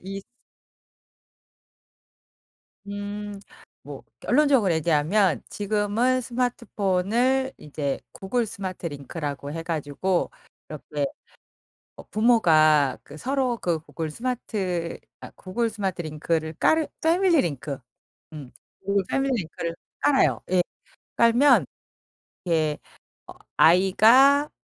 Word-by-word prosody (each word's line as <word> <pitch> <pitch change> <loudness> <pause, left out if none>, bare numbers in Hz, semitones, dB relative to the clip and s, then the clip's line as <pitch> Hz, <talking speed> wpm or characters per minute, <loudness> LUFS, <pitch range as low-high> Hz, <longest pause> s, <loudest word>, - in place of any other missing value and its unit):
이 195 +1 -5 2.7
음. 205 0 -6 0.5
뭐 - - -9 0.2
결론적으로 260 - +3
얘기하면 160 - +2
지금은 215 +5 0
스마트폰을 240 +1 0
이제 145 -2 -4
구글 230 +5 -1
스마트 185 -3 -6
링크라고 145 0 -6
해 165 - -4
가지고 165 +3 -1 0.4
이렇게 150 -1 -4 0.9
어 - - -10
부모가 155 - +4
그 145 - -12
서로 260 - -1
그 175 -6 -1
구글 160 0 -6
스마트 195 -7 -3 0.2
아 - - -10
구글 225 +5 -2
스마트 195 -5 -3
링크를 160 0 -2
깔으 315 - +2
패밀리 340 -1 +3
링크. 145 -3 -4 0.6
음. 140 -5 -9 0.3
구글 200 0 +1
패밀리 270 0 0
링크를 165 +1 -5 0.2
깔아요. 280 -2 +3
예. 185 - +4 0.6
깔면 235 +5 +5 0.8
이렇게 155 -3 0 0.6
어 - - -23
아이가 230 - +5
195 Hz, 215 characters per minute, -25 LUFS, 160-240 Hz, 2.7 s, 깔면